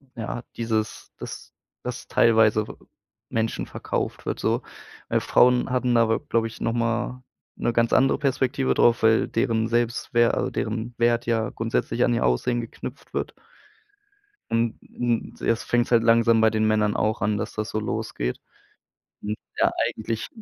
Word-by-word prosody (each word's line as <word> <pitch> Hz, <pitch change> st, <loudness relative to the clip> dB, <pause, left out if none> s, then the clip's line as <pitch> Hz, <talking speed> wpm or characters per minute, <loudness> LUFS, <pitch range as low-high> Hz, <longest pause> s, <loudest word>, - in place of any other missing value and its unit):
ja, 115 Hz, +1 st, -5 dB
dieses 110 Hz, -2 st, -2 dB
dass -, -, -9 dB, 0.3 s
dass 125 Hz, 0 st, -6 dB
teilweise 110 Hz, -2 st, +4 dB
w -, -, -8 dB, 0.6 s
Menschen 115 Hz, 0 st, -1 dB
verkauft -, -, -4 dB
wird -, -, -3 dB
so, -, -, +1 dB, 0.5 s
weil, -, -, +2 dB
Frauen 125 Hz, +1 st, +4 dB
hatten 125 Hz, -1 st, +1 dB
aber 115 Hz, -1 st, +3 dB
glaube 115 Hz, -1 st, 0 dB
ich 115 Hz, -, -11 dB
noch 115 Hz, -, 0 dB
mal 120 Hz, +2 st, -1 dB, 0.3 s
'ne -, -, 0 dB
ganz 115 Hz, 0 st, +2 dB
andere 135 Hz, +1 st, +4 dB
Perspektive 135 Hz, -1 st, +1 dB
drauf, 120 Hz, -1 st, +3 dB
weil 110 Hz, 0 st, +4 dB
deren 115 Hz, -1 st, 0 dB
Selbstwer 120 Hz, 0 st, +1 dB
also, -, -, -1 dB
deren 115 Hz, +2 st, -3 dB
Wert 120 Hz, 0 st, +2 dB
ja 115 Hz, -2 st, +1 dB
grundsätzlich 115 Hz, +1 st, -1 dB
an 120 Hz, -, +2 dB
ihr 115 Hz, -, +1 dB
Aussehen 120 Hz, -, +1 dB
geknüpft 115 Hz, -, -9 dB
wird. -, -, -2 dB, 1.2 s
Und 115 Hz, 0 st, +1 dB, 0.2 s
und 120 Hz, -2 st, -1 dB
jetzt 115 Hz, 0 st, 0 dB
fängt's 120 Hz, 0 st, +1 dB
halt 115 Hz, -2 st, +5 dB
langsam 115 Hz, 0 st, +5 dB
bei 110 Hz, 0 st, +5 dB
den 110 Hz, 0 st, +1 dB
Männern 105 Hz, -1 st, +2 dB
auch 110 Hz, +1 st, 0 dB
an, 105 Hz, 0 st, +1 dB
dass 105 Hz, +1 st, -4 dB
das 110 Hz, +1 st, -3 dB
so 110 Hz, -, -1 dB
losgeht. 60 Hz, -, -3 dB, 0.8 s
Hm, 105 Hz, +1 st, -2 dB, 0.2 s
ja, -, -, +4 dB, 0.2 s
eigentlich 110 Hz, 0 st, -4 dB
115 Hz, 160 wpm, -24 LUFS, 110-120 Hz, 1.2 s, halt